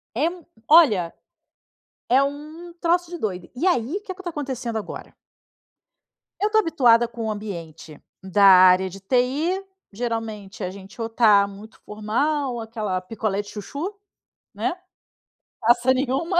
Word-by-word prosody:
É 280 - +1
m 345 -1 -5 0.2
olha, 220 - +5 1.0
é 260 +3 +5
um 305 +5 -6
troço 345 0 +1
de 350 - -6
doido. 185 - -4
E 330 - -2
aí, 315 - +1
que 390 - -8
é - - -7
que 380 - -12
tá 350 - -3
acontecendo 260 -7 -4
agora 215 - -8 1.3
Eu 420 +1 +1
tô 435 - +3
habituada 240 - +4
com 230 -1 -6
o - - -1
ambiente 165 -7 -7 0.2
da 200 +1 +2
área 185 0 +7
de 195 +2 -11
TI. 265 - 0 0.3
Geralmente 220 -3 -5
a 180 - -2
gente 195 +4 -12
ou 225 - -2
tá 210 -3 +4
muito 205 +3 -13
formal, 250 +7 -1
ou 235 - -4
aquela 215 -5 -3
picolé 205 +1 -3
de 205 - -15
chuchu, 285 - -6 0.6
né? 350 - -2 0.9
Passa 240 +2 +4
nenhuma 270 +7 -1
235 Hz, 150 wpm, -23 LUFS, 205-300 Hz, 1.3 s, área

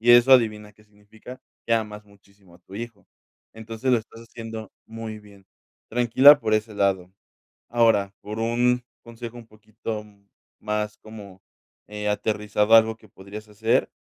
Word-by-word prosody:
y 120 +1 +6
eso 120 +2 +6
adivina 110 -4 +3
qué 105 +1 -24
significa, 105 +4 -14 0.3
que 115 - 0
amas 105 -2 -3
muchísimo 100 -2 -23
a - - -18
tu 95 - -15
hijo. 110 -4 -8 0.5
Entonces, 115 +3 -4
lo 120 - +5
estás 115 +1 -13
haciendo 115 -2 -9 0.2
muy 110 -1 -7
bien, 100 -2 -18 0.4
tranquila 125 +5 +7
por 110 -6 0
ese 110 0 -1
lado. 95 -2 0 0.6
Ahora, 115 -4 +2
por 105 +1 -6
un 120 +2 +1 0.2
consejo 115 0 -9
un 115 -1 -12
poquito 110 0 -7 0.6
más 105 0 -3
como, 100 -3 -12 0.5
eh, 105 0 -4
aterrizado 105 +1 0
a - - +11
algo 110 0 -2
que 110 - -20
podrías 100 +2 -11
hacer, 110 +2 0
110 Hz, 155 wpm, -24 LUFS, 105-115 Hz, 0.6 s, a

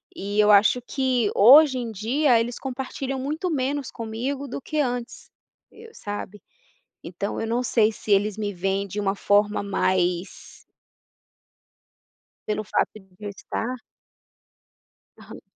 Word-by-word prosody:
e 205 +2 -3
eu 210 0 +6
acho 210 +5 +5
que 255 -4 0
hoje 265 +4 +7
em 235 -2 -4
dia 235 +5 +2
eles 235 +1 -3
compartilham 265 0 -4
muito 305 +7 -3
menos 280 -1 -2
comigo 250 +5 -4
do 260 - -6
que 305 +3 -3
antes, 245 -3 -3 0.4
eu 450 +1 -14
sabe. 205 -1 -7 0.6
Então 185 +4 -4
eu 225 - -3
não 235 +2 0
sei 225 -3 +2
se 210 - -6
eles 205 +1 +2
me 205 -2 -3
veem 195 +2 -1
de 205 +3 -5
uma 195 -1 0
forma 205 +1 +2
mais 185 -2 -1 1.9
pelo 215 0 -2
fato 210 - 0
de 195 -3 -14 0.2
eu - - -3
estar 225 +4 -4 1.4
Aham. - - -12
225 Hz, 135 wpm, -24 LUFS, 205-260 Hz, 1.9 s, hoje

